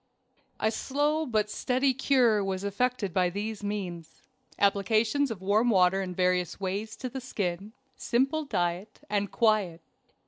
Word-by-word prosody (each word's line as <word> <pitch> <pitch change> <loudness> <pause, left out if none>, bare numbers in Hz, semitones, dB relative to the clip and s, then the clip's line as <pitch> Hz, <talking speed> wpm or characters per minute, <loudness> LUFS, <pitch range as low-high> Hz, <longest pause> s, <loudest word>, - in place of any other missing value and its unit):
A 220 - +1
slow 295 +5 0
but 215 -3 +1
steady 260 +5 +1
cure 245 -5 +3
was 190 0 -3
effected 205 -1 -1
by 180 -1 +2
these 205 +3 -5
means: 185 -5 -5 0.3
applications 220 +7 +2
of 200 -5 -6
water 195 -2 +3
in 185 -2 -5
various 180 -1 0
ways 200 +3 -3
to 255 - -5
the 260 +2 -6
skin, 200 -4 -4 0.2
simple 270 +6 0
diet, 180 -4 -2
and 205 -1 0
quiet. 210 -7 +1
210 Hz, 135 wpm, -28 LUFS, 190-245 Hz, 0.3 s, cure